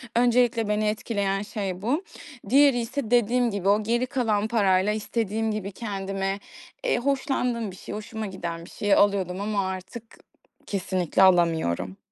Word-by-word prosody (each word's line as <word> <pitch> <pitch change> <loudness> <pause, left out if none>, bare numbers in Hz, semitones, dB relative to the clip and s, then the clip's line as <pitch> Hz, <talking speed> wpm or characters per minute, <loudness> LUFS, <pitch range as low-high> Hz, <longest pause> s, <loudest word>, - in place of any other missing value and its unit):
Öncelikle 240 -2 +3
beni 210 0 +1
etkileyen 200 -2 -1
şey 200 -3 -4
bu. 285 - 0 0.5
Diğeri 275 -1 +5
ise 235 0 -4
dediğim 240 0 +3
gibi, 200 -1 -1
o 210 +1 +3
geri 240 +3 +1
kalan 220 -5 0
parayla 200 -3 +2
istediğim 220 0 -1
gibi 205 -2 -4
kendime, 195 -2 -3 0.4
eee, - - +2
hoşlandığım 250 - -1
bir - - -12
şey, 200 - -8
hoşuma 215 +1 -5
giden 170 -4 -5
bir - - -13
şey 205 -1 0
alıyordum. 195 -2 +2
Ama 200 -2 -1
artık 190 +5 -6 0.6
kesinlikle 185 -2 0
alamıyorum. 160 - +2
210 Hz, 145 wpm, -25 LUFS, 190-235 Hz, 0.6 s, Diğeri